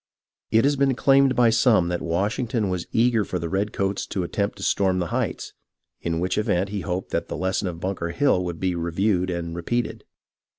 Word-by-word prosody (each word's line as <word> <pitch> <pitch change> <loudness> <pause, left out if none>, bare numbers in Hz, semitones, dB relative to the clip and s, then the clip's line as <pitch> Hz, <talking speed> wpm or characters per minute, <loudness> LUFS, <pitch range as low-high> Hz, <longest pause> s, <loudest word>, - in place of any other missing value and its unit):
It 115 0 +4
has 145 +1 +3
been 135 -1 +2
claimed 135 0 +4
by 120 -2 +5
some 115 -6 +3
that 90 -1 -2
Washington 105 +5 -1
was 90 -2 -3
eager 115 -1 +3
for 95 - -3
the 85 -1 -3
redcoats 100 0 -1
to 95 - -2
attempt 100 +4 -2
to 100 - -8
storm 95 -2 +2
the 90 -2 -2
Heights, - - -2 0.5
in 85 -1 -1
which 90 +3 0
event 95 -2 0
he 100 -1 -3
hoped 90 +3 -4
that - - -1
the - - -5
lesson 95 +1 -1
of 85 -2 -5
Bunker 90 -2 -3
Hill 95 -3 +2
would 85 -2 -4
be 95 -1 0
reviewed 90 +3 0
and 85 -1 -3
repeated. 120 +8 -2
95 Hz, 200 wpm, -24 LUFS, 90-110 Hz, 0.5 s, by